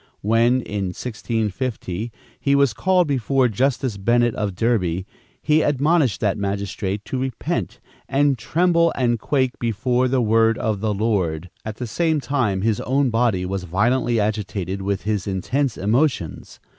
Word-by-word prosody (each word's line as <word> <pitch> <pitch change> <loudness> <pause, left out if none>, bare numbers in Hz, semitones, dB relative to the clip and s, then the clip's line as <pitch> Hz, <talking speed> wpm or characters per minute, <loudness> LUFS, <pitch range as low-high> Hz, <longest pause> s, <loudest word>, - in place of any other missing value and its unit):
When, 115 +4 +3
in 105 -4 -3
1650, 110 -2 -3 0.3
he 140 0 +2
was 140 -3 +3
called 185 -2 +2
before 135 -1 +2
Justice 125 0 0
Bennet, 120 +3 +2
of 105 -3 -3
Derby, 95 -6 0 0.4
he 155 +1 +3
admonished 145 - +2
that 105 0 0
magistrate 100 0 -3
to 130 - -3
repent 130 -2 -3 0.3
and 140 0 +3
"tremble 170 +7 +2
and 120 -3 +1
quake 130 +1 0
before 125 +2 +1
the 130 +1 +1
word 115 -1 +3
of 110 -3 -1
the 110 +1 -1
Lord," 95 -6 -1
at 110 -1 -5
the 125 - -5
same 160 +7 0
time 125 -9 0
his 110 -2 +1
own 135 +1 +1
body 110 -6 +1
was 95 0 -3
violently 115 +6 +1
agitated 100 -3 -2
with 100 0 -2
his 105 -2 -1
intense 120 +7 -1
emotions. 110 - -1
115 Hz, 145 wpm, -22 LUFS, 100-130 Hz, 0.4 s, When